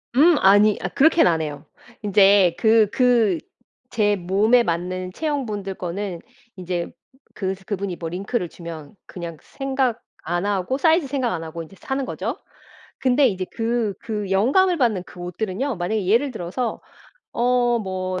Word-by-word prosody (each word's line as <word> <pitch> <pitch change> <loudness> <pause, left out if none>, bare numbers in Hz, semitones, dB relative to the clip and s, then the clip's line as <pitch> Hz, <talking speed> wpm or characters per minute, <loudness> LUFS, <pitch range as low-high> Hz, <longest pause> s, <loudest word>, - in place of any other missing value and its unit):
음 315 +5 +6
아니 205 +2 +5
아 - - -2
그렇게는 315 - +4
안 160 -1 0
해요. 150 -1 -6 0.4
인제 195 -3 +5
그 220 -1 +5
그 245 0 +3 0.5
제 210 -3 +2
몸에 205 +6 +3
맞는 180 0 -3
체형분들 220 -11 -3
거는 180 0 -4 0.4
인제 180 -2 -4 0.4
그 190 -1 -2
스 190 - -21
그분이 200 -2 -3
뭐 165 -1 -5
링크를 190 +2 -2
주면 165 -3 -9
그냥 170 -3 -7
생각 265 -3 -2 0.2
안 175 +3 -2
하고 205 +5 -1
사이즈 320 0 +3
생각 260 -3 -1
안 165 -2 -4
하고 165 +1 -6
인제 165 +4 -15
사는 270 0 -3
거죠. - - -4 0.6
근데 260 +1 +3
이제 190 -2 -3
그 230 -2 -1
그 210 -3 -4
영감을 315 - +3
받는 220 -8 +1
그 180 - -13
옷들은요 200 - -3
만약에 185 +3 -2
예를 235 +7 +3
들어서 220 +3 -4 0.5
어 240 0 +2
뭐 185 -2 -3
205 Hz, 285 characters per minute, -22 LUFS, 180-245 Hz, 0.6 s, 음